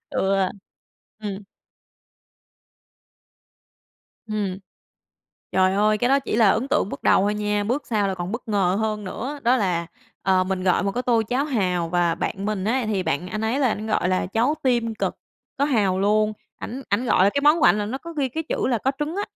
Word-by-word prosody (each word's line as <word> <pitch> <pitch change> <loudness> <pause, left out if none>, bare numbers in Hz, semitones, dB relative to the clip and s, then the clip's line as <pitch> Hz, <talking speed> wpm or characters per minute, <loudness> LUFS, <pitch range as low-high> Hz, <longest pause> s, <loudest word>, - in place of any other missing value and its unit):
Ừ, 195 +1 +1 0.9
ừm. 205 -1 -5 2.8
Ừm. 205 -3 -2 0.9
Trời 190 0 +3
ơi, 210 +1 +2
cái 245 - +1
đó 275 - +4
chỉ 270 - -3
là 220 -4 +5
ấn 230 +7 0
tượng 280 -8 +1
bước - - -7
đầu - - +4
thôi 205 +1 +1
nha, 210 0 -1
bước 250 +7 -2
sau 210 -4 0
là 190 - -1
còn 180 +1 -5
bất 230 0 -6
ngờ 195 -3 +2
hơn 215 -1 -2
nữa. 260 +10 -5
Đó 245 +2 +4
là, 180 -6 0 0.4
ờ, 185 -1 +3
mình 185 -1 -2
gọi 185 -1 +2
một 195 0 -1
cái 250 - -2
tô 235 -3 +2
cháo 260 +3 +1
hàu 180 - 0
và 175 -1 +1
bạn 195 +3 -3
mình 210 -3 -2
ấy 235 +2 0
thì 205 -3 0
bạn 160 +2 -2
anh 210 +3 -4
ấy 225 +5 0
là 265 - +3
ảnh 215 -1 -3
gọi 215 -4 +1
là 185 -1 +1
cháo 230 +9 +1
tim 235 -3 +1
cật, - - -1 0.4
có 280 - +2
hàu 205 -10 +1
luôn, 215 +1 +2 0.2
ảnh 260 +4 -6
ảnh 205 +5 +1
gọi 205 -6 +4
là 200 - +4
cái 280 - 0
món 300 +3 +5
của - - +3
ảnh 210 - +5
là 205 - -1
nó 255 +5 -4
có 335 +4 -9
ghi 285 -5 -1
cái 320 +6 -4
chữ - - -1
là 240 -3 +1
có 265 - 0
trứng 310 +4 -3
á. 405 - 0
215 Hz, 215 wpm, -23 LUFS, 190-250 Hz, 2.8 s, là